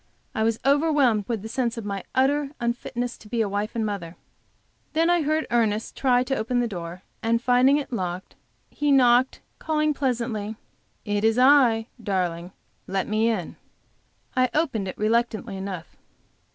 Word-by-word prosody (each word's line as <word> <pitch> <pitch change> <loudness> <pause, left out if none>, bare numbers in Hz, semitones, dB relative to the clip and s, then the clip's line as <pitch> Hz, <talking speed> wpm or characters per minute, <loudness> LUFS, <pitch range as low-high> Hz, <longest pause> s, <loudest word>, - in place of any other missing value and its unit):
I - - -2
was 225 0 +1
overwhelmed 280 -7 +3
with 225 -4 -3
the - - -5
sense 235 0 -1
of 225 - -5
my 200 -2 -4
utter 280 +2 +2
unfitness 240 0 -3
to 210 - -15
be 235 - -2
a 215 - +1
wife 205 +3 -3
and 225 - 0
a - - 0
mother. 185 -5 -4 0.8
Then 330 +2 +3
I 350 -1 +3
heard 310 +1 0
Ernest 220 -2 0
try 250 -2 +3
to 270 +1 -1
open 245 +1 -1
the 240 - +1
door; 175 -3 -7 0.2
and 230 +1 +1
finding 250 +3 +4
it 285 -3 -5
locked, 180 -3 -4 0.4
he 290 -1 0
knocked, 255 -1 +4 0.2
calling 305 -1 +1
pleasantly: 230 -6 -2 0.5
"It 205 -1 -1
is 225 +1 +3
I, 250 -4 +5 0.2
darling; 180 -4 -2 0.4
let 190 0 -1
me 220 +2 +2
in." 195 -8 -3 0.8
I 255 0 +3
opened 270 -11 0
it 185 - -6
reluctantly 220 -1 0
enough. 190 -3 -6
230 Hz, 165 wpm, -25 LUFS, 205-260 Hz, 0.8 s, I